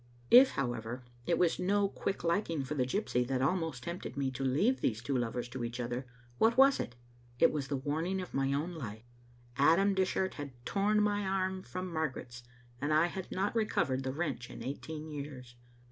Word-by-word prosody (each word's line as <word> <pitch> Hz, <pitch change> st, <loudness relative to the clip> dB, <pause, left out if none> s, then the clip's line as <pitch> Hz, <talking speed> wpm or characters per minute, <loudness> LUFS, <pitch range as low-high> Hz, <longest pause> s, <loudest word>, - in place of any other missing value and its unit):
If, 260 Hz, +2 st, +9 dB
however, 120 Hz, -1 st, -3 dB, 0.2 s
it 170 Hz, -, +3 dB
was 175 Hz, -2 st, +2 dB
no 200 Hz, +2 st, +2 dB
quick 195 Hz, -1 st, -3 dB
liking 170 Hz, -3 st, 0 dB
for 135 Hz, -, -4 dB
the 130 Hz, -4 st, 0 dB
gypsy 130 Hz, -, 0 dB
that 130 Hz, -1 st, 0 dB
almost 160 Hz, -5 st, 0 dB
tempted 170 Hz, -5 st, -5 dB
me 135 Hz, -1 st, 0 dB
to 135 Hz, +1 st, -4 dB
leave 175 Hz, -, +2 dB
these 110 Hz, -2 st, +1 dB
two 130 Hz, +3 st, -2 dB
lovers 120 Hz, 0 st, -1 dB
to 125 Hz, 0 st, -5 dB
each 120 Hz, +1 st, -4 dB
other, 120 Hz, +1 st, -3 dB, 0.3 s
what 230 Hz, +2 st, +4 dB
was 275 Hz, +1 st, +6 dB
it? 120 Hz, -, -4 dB, 0.4 s
It 165 Hz, -, +5 dB
was 145 Hz, -3 st, -2 dB
the 140 Hz, -, -1 dB
warning 160 Hz, +7 st, -1 dB
of 180 Hz, -, -6 dB
my 135 Hz, 0 st, +1 dB
own 150 Hz, +6 st, -1 dB
life. 115 Hz, -8 st, -7 dB, 0.5 s
Adam 170 Hz, +8 st, +5 dB
Dishart 190 Hz, 0 st, +1 dB
had 145 Hz, -3 st, -7 dB
torn 210 Hz, +1 st, +2 dB
my 205 Hz, 0 st, +1 dB
arm 190 Hz, -1 st, -1 dB
from 185 Hz, -1 st, -5 dB
Margaret's, 130 Hz, -6 st, -3 dB, 0.4 s
and 145 Hz, +2 st, 0 dB
I 155 Hz, +2 st, +5 dB
had 185 Hz, +1 st, -5 dB
not 200 Hz, +4 st, -1 dB
recovered 140 Hz, -, +1 dB
the 130 Hz, 0 st, -2 dB
wrench 135 Hz, -5 st, -3 dB
in -, -, -8 dB
eighteen 155 Hz, +4 st, -5 dB
years. 140 Hz, -4 st, -7 dB
150 Hz, 190 wpm, -32 LUFS, 130-190 Hz, 0.5 s, If